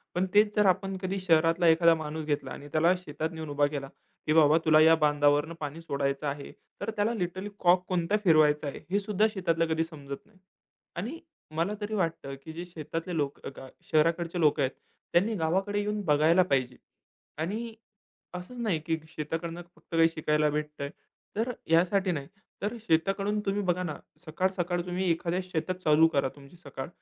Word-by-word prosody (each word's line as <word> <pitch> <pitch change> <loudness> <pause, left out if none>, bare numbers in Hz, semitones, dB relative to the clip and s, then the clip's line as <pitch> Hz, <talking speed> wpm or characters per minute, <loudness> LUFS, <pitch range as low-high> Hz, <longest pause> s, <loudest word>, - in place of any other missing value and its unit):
पण 180 +1 +2
तेच 210 0 +4
जर 210 - +4
आपण 190 +1 +2
कधी 190 +1 -2
शहरातला 165 -1 +3
एखादा 165 0 +6
माणूस 155 0 -5
घेतला 145 -1 -2
आणि 145 - -8
त्याला 165 +3 +4
शेतात 160 -2 -4
नेऊन 160 -2 -6
उभा 145 0 +2
केला 140 -2 -5 0.4
की 155 - +2
बाबा 155 0 +6
तुला 155 -1 +6
या 160 +1 +7
बांधावरनं 145 +2 +3
पाणी 150 +2 -5
सोडायचं 140 -1 -2
आहे 140 0 -5 0.3
तर - - -2
त्याला 210 +3 +1
लिटरली 185 0 -3
कॉक 180 +1 +4
कोणता 180 +3 +1
फिरवायचा 155 -3 +4
आहे 140 - -5
हे 200 - +3
सुद्धा 210 +1 +2
शेतातला 165 -4 +1
कधी 160 0 +1
समजत 140 -4 -9
नाही 210 -2 -25 0.6
आणि 240 - -4 0.4
मला 170 +6 0
तरी 210 +1 -3
वाटतं 165 -7 -2
की 160 - -8
जे 170 +2 -6
शेतातले 165 +1 -5
लोक 145 -2 -2 0.5
शहराकडचे 170 +2 +2
लोक 150 -2 +3
आहेत 135 -1 +2 0.4
त्यांनी 210 +6 +3
गावाकडे 190 +5 0
येऊन 210 0 -2
बघायला 155 +4 +4
पाहिजे 130 -2 +1 0.7
आणि 220 +7 -3 0.6
असंच 180 +8 -8
नाही 200 -9 0
की 160 0 +1
शेताकडनं 165 +2 -4
फक्त 165 - -9
काही 165 0 +5
शिकायला 150 -1 +1
भेटतंय. 150 -1 -3 0.5
तर 225 +4 0 0.2
ह्यासाठी 185 +3 +3
नाही. 140 -4 -4 0.3
तर 210 +4 -2
शेताकडून 195 +6 +1
तुम्ही 200 +1 0
बघा 180 0 +1
ना 155 -4 -3 0.3
सकाळ-सकाळ 175 +1 -1
तुम्ही 180 0 -1
एखाद्या 170 +2 -1
शेतात 180 0 -3
चालू 155 +1 +6
करा 135 -1 +2
तुमची 140 +4 -15
सकाळ. 135 -4 -7
165 Hz, 170 wpm, -28 LUFS, 150-185 Hz, 0.7 s, या